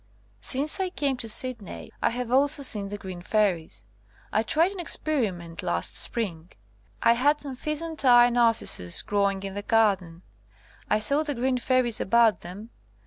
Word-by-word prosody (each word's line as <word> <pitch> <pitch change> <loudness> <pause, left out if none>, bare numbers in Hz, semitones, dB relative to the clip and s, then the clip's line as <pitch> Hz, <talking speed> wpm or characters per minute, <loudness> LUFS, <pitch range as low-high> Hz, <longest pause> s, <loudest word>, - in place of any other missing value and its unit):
Since 285 +6 +2
I 375 -1 -1
came 285 -7 -2
to 230 - -3
Sydney, 235 -3 0
I - - +2
have 245 0 -5
also 285 +2 +3
seen 205 -6 +2
the 205 - -6
green 185 -3 -9
fairies. 175 - -2 0.5
I 215 - +2
tried 320 - +1
an 395 - -9
experiment 205 - -1
last 85 0 -2
spring. 175 -8 -4 0.5
I 230 - +5
had 290 +5 +1
some 280 -2 -7
pheasant 305 +3 -3
eye 245 -1 +5
narcissus 230 - +1
growing 200 -1 -1
in 195 -1 -6
the 205 - -5
garden. 200 -7 0 0.7
I - - +2
saw 280 +8 +4
the 295 -2 -3
green 255 +1 -1
fairies 250 -2 +1
about 225 -1 +2
them. 200 +6 -10
230 Hz, 160 wpm, -25 LUFS, 195-270 Hz, 0.7 s, I